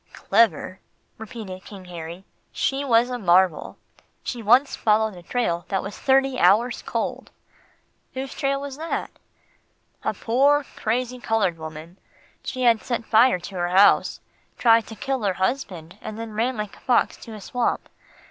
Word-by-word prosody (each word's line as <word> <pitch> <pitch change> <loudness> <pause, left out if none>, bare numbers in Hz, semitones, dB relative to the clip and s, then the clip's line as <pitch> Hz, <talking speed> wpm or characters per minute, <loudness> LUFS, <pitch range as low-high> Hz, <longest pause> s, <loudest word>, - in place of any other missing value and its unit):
"Clever," 205 -3 +1 0.4
repeated 215 -5 -8
King 195 -3 -11
Harry, 170 +1 -8 0.3
"she 275 +1 -1
was 245 -2 +3
a 245 - -3
marvel. 180 -3 +2 0.5
She 240 - -4
once 245 +6 +4
followed 220 0 +2
a 180 - -11
trail 175 -3 -1
that 195 - -1
was 200 - -6
thirty 270 -1 +2
hours 215 +8 +3
cold." - - -3 0.9
"Whose 265 +1 -4
trail 275 0 -1
was 280 -1 -7
that?" 325 +2 -3 0.9
"A - - -1
poor, 280 +5 +2
crazy, 250 +3 -2
coloured 215 -8 0
woman. 160 +3 -9 0.4
She 255 -1 -4
had 230 -2 +4
set 235 -2 -3
fire 230 -1 +5
to 190 +2 -9
her 175 0 -1
house, 195 +3 +4 0.4
tried 230 -2 +4
to 220 - -9
kill 265 +2 -2
her 200 -3 +1
husband, 185 -5 -3
and 215 - -7
then 225 -1 -6
ran 235 +3 -1
like 210 -1 -5
a - - -18
fox 245 -2 +2
to 225 - -10
a - - -8
swamp. 245 +4 -2
225 Hz, 155 wpm, -24 LUFS, 190-250 Hz, 0.9 s, fire